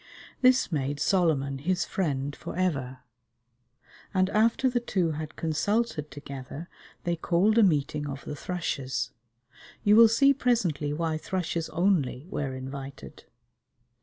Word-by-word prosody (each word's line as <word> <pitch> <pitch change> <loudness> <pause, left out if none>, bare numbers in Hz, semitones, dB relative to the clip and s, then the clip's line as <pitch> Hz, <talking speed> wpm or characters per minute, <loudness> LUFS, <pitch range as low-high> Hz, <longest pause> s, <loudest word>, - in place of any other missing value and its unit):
This 255 -3 +4
made 145 -1 -1
Solomon 145 -8 +1
his 180 +5 0
friend 145 -6 -2
for - - -7
ever, 135 -8 -1 1.1
and 185 +1 +2
after 230 +4 +3
the 245 -1 +1
two 185 -8 0
had 155 0 -6
consulted 160 +1 -1
together 140 +3 -8 0.4
they 175 0 0
called 185 +7 +2
a - - +7
meeting 150 -5 +1
of 135 -1 -6
the 150 - -5
thrushes. 135 -7 -3 0.7
You 205 0 +5
will 230 +1 +9
see 275 +5 +5
presently 195 - 0
why 160 +1 -1
thrushes 170 -2 -2
only 165 -7 +1
were 140 -3 -2
invited. 135 +1 -8
160 Hz, 130 wpm, -27 LUFS, 140-190 Hz, 1.1 s, will